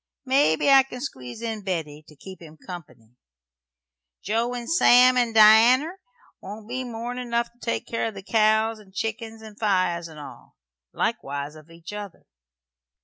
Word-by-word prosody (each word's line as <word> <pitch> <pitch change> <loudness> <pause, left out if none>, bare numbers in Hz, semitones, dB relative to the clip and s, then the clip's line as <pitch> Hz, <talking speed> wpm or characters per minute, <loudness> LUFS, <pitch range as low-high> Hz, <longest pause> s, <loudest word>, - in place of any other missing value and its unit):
Mebbe 260 - +2
I 275 -1 +7
can 255 -1 -8
squeeze 130 - -7
in 220 -2 -4
Betty, 160 -5 -4
to 150 - -16
keep 185 +5 -12
him 160 -2 -13
company. 150 - -12 1.1
Joe 230 +4 -1
and 240 -1 -6
Sam 255 -6 +5
and 240 -2 0
Dianner 240 - +6 0.4
won't 210 +2 -9
be 255 +2 -4
more'n 240 +1 -6
enough 235 -1 -2
to 240 - -35
take 230 - -3
care 230 - -2
o' - - -4
the 195 -2 -10
cows 220 +1 +2
and 195 -2 -19
chickens 225 +1 -5
and 215 -1 -13
fires, 185 -5 0
and 160 -2 -12
all. 145 - -12 0.4
Likewise 140 +1 -3
of 155 +1 -16
each 165 +3 -11
other." 205 -3 -9
220 Hz, 160 wpm, -24 LUFS, 170-240 Hz, 1.1 s, I